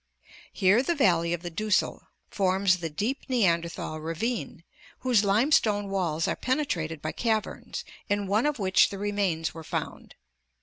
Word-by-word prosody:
Here 195 +5 +4
the 335 +6 0
valley 170 - +3
of 175 0 -2
the 175 - -5
Dussel 215 +4 0 0.2
forms 190 -1 +2
the 165 -1 -3
deep 220 - -2
Neanderthal 170 -8 0
ravine, 165 +3 -3 0.4
whose 245 -5 +3
limestone 210 -1 +2
walls 165 -5 0
are - - 0
penetrated 170 - -2
by 155 - -2
caverns, 220 -3 -2 0.2
in 205 0 0
one 210 +8 +2
of 295 - -1
which 190 -3 +4
the 200 - -6
remains 195 -5 -1
were 165 -1 -9
found. - - -5
195 Hz, 145 wpm, -27 LUFS, 170-220 Hz, 0.4 s, Here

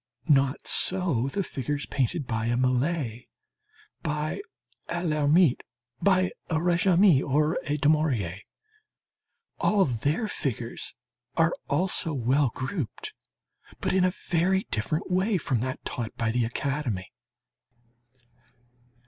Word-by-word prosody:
Not 140 -1 +3
so 175 -10 +2
the 195 +8 -1
figures 145 -1 -3
painted 140 +3 -1
by 110 -1 -2
a 120 +1 +1
Millet, 130 -1 0 0.8
by 150 - -2 0.5
a 175 +1 -2
Lhermitte, 150 -1 +3 0.4
by 185 -2 +3 0.2
a 160 - 0
Régamey, 175 -1 +4
or 150 +3 +1
a 145 +1 0
Daumier. 140 - +1 1.2
All 200 -2 +3
their 145 - -1
figures 125 - -3 0.4
are 165 0 +4 0.2
also 180 -3 0
well 130 +2 +2
grouped, 130 - -5 0.7
but - - -1
in 190 -1 +3
a 185 - +4 0.2
very 185 +3 +2
different 155 - -2
way 190 +3 +2
from 130 -7 -1
that 130 +2 -4
taught 115 -3 -4
by 115 -1 0
the 120 0 +1
academy. 120 -5 -3
150 Hz, 115 wpm, -27 LUFS, 125-175 Hz, 1.2 s, Régamey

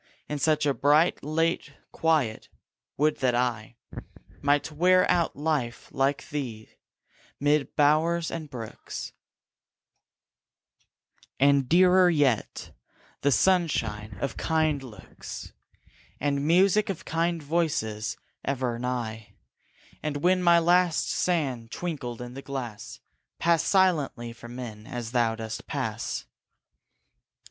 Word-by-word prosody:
In 150 - -3
such 150 +1 +2
a 140 - +2
bright, 150 +5 +3
late 155 0 -1 0.2
quiet, 150 -9 0 0.5
would 150 +2 +2
that 125 -3 +1
I 120 -2 -1 0.7
Might 145 +1 +1
wear 180 +4 +4
out 170 -2 +1
life 145 -5 -2
like 135 +1 0
thee, 120 -7 -5 0.7
mid 145 0 +1
bowers 160 +3 +2
and 160 -3 -5
brooks, 115 -5 -7 2.3
And, 140 -1 +4
dearer 180 +1 +6
yet, 145 -9 0 0.5
the 140 - +3
sunshine 110 - +1
of 140 -4 -3
kind 155 -3 +1
looks, 110 -8 -10 0.7
And 140 +1 0
music 195 +5 +4
of 190 - -4
kind 165 0 -1
voices 140 -9 -1 0.3
ever 125 -3 -2
nigh; 120 -3 -4 0.7
And 150 -1 -2
when 185 +1 +4
my 170 -1 +6
last 175 0 +3
sand 135 -10 -1
twinkled 130 -7 -5
in 120 0 -8
the 135 - -7
glass, 130 -6 -6 0.4
Pass 170 -1 +2
silently 150 -11 +1
from 120 +1 -11
men, 110 -4 -8
as 120 -2 -5
thou 120 -2 +2
dost 110 +1 -6
pass. 115 -5 -3
145 Hz, 110 wpm, -27 LUFS, 120-165 Hz, 2.3 s, dearer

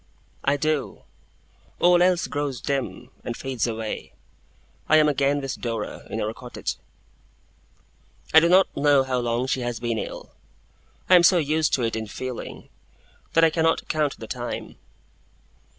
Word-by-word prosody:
I 140 +1 +2
do. 155 0 -2 0.8
All 175 0 +5
else 180 -1 +3
grows 145 -4 -3
dim, 140 -2 -3
and 120 - -5
fades 130 -3 -2
away. 110 -1 -5 0.8
I 155 - +7
am 155 -1 +5
again 140 0 +2
with 135 -2 -5
Dora, 115 -3 -4
in 110 - -3
our 110 0 -2
cottage. 125 +1 -5 1.6
I 160 - +10
do 170 +1 +2
not 185 +1 +4
know 140 -1 +4
how 130 -1 -1
long 120 +1 -1
she 130 0 -1
has 120 -2 -3
been 115 -2 -2
ill. - - -7 0.8
I - - +4
am 180 - +9
so 175 +1 +6
used 155 0 +1
to 125 - -2
it 115 -1 -1
in 110 -1 -4
feeling, 130 +3 -7 0.7
that 165 - +4
I 165 - +5
cannot 165 0 +1
count 150 -3 0
the 110 - -8
time. 120 +1 -6
135 Hz, 155 wpm, -24 LUFS, 120-155 Hz, 1.6 s, I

